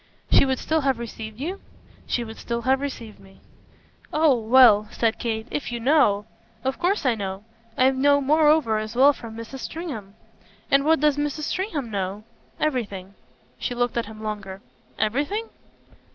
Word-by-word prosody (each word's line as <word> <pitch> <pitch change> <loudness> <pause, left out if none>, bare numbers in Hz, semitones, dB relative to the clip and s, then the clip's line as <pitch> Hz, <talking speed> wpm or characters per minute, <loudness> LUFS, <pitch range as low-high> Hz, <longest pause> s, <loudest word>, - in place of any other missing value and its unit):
"She - - +6
would 260 0 0
still 315 +4 0
have 270 -3 +1
received 220 -1 -7
you?" 355 +8 -4 0.5
"She 240 - -1
would 220 -1 -9
still 235 0 -3
have 265 +1 +2
received 235 -6 -6
me." 195 0 -18 0.7
"Oh 305 -2 +4
well," 225 -2 +6
said 230 -1 0
Kate, 220 -2 -2
"if 290 - -3
you 240 - -3
know 230 -6 +3 0.2
!" 220 - -33
"Of 265 0 -2
course 365 -2 0
I 255 - +4
know. 195 -2 -5 0.3
I 260 +1 +5
know 285 +2 +3
moreover 295 -5 +3
as 215 +2 -6
well 275 +3 +6
from 230 -4 -10
Mrs. 230 +4 -8
Stringham." 240 - -6 0.6
"And 275 0 +4
what 320 -2 +3
does 300 -1 +3
Mrs. 295 +1 -2
Stringham 310 - -3
know?" 195 +1 -3 0.4
"Everything." 205 -10 -2 0.5
She 245 - -3
looked 245 0 0
at 235 -3 -1
him 220 0 -10
longer. 200 -2 -6 0.3
"Everything?" 290 - -1
245 Hz, 165 wpm, -24 LUFS, 220-285 Hz, 0.7 s, She